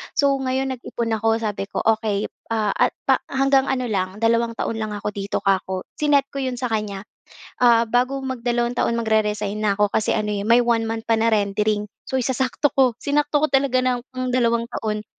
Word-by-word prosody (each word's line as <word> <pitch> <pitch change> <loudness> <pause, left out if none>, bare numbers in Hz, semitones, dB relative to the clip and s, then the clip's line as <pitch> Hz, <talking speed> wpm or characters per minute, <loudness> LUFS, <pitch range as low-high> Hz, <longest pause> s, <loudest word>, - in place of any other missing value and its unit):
So 280 -1 +3
ngayon, 265 0 -1
nag-ipon 235 -2 -4
ako. 225 +1 +2
Sabi 205 -2 -3
ko, - - -3
"Okey, 215 -2 +1 0.2
ah, 215 -3 0
a - - +3 0.2
pa - - +3
hanggang 270 0 +2
ano 255 -2 0
lang, 190 -3 -2
dalawang 230 +1 +1
taon 225 0 -2
lang 215 - -3
ako 205 0 -3
dito," 200 0 -3
kako. 190 -1 0 0.2
Sinet 290 -2 +3
ko 275 - -5
'yon 255 -1 -2
sa 250 -1 -3
kanya. 210 -3 -2 0.6
Ah, 235 -2 +5
bago 250 +4 +1
mag-dalawang 240 -2 -1
taon, 235 - 0
mag-re-resign 210 -2 0
na 205 -2 +1
ako. 205 0 +1
Kasi 215 - +1
ano 210 -1 -1
eh, 200 -1 -2
may 235 +3 +4
1 230 -1 +1
month 225 0 -4
pa 230 - +3
na 225 - +3
rendering. 210 0 0 0.2
So 265 - -1
isasakto 260 +3 0
ko. 255 -4 +3
Sinakto 295 +1 +1
ko - - +5
talaga 270 -1 +3
ng 255 0 -2
dalawang 235 -2 +2
taon. 215 -1 -3
230 Hz, 195 wpm, -22 LUFS, 210-255 Hz, 0.6 s, Ah